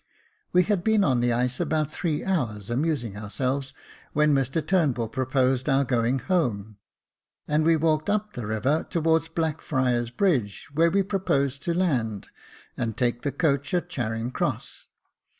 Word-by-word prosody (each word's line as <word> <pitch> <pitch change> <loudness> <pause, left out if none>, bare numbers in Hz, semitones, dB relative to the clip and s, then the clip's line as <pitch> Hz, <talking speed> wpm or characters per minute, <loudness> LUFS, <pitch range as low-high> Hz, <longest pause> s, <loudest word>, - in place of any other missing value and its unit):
We 180 0 +5
had 200 -2 0
been 220 -2 +3
on 130 -7 +2
the 120 0 +2
ice 125 +2 0
about 155 -1 0
three 155 -2 -2
hours, 120 - -2
amusing 125 -5 -1
ourselves, 130 +7 -2 0.4
when 150 0 +3
Mr 135 +3 0
Turnbull 145 - +1
pro 130 +2 -2
posed 130 0 +1
our 135 0 +3
going 120 +1 +1
home, 115 - -1 0.7
and 150 +1 +2
we 165 +1 +4
walked 155 +1 +1
up 210 0 0
the 120 -4 -5
river 120 +9 0
towards 165 -1 +1
Blackfriars 130 -7 0
Bridge 125 - 0
where 165 +3 +4
we 195 +3 +2
proposed 140 -9 0
to 170 - 0
land, 120 - 0 0.5
and 115 -2 -3
take 120 -1 0
the 145 - -1
coach 140 +3 0
at 175 0 -1
Charing 115 -4 -3
Cross. - - -3
140 Hz, 155 wpm, -25 LUFS, 120-165 Hz, 0.7 s, We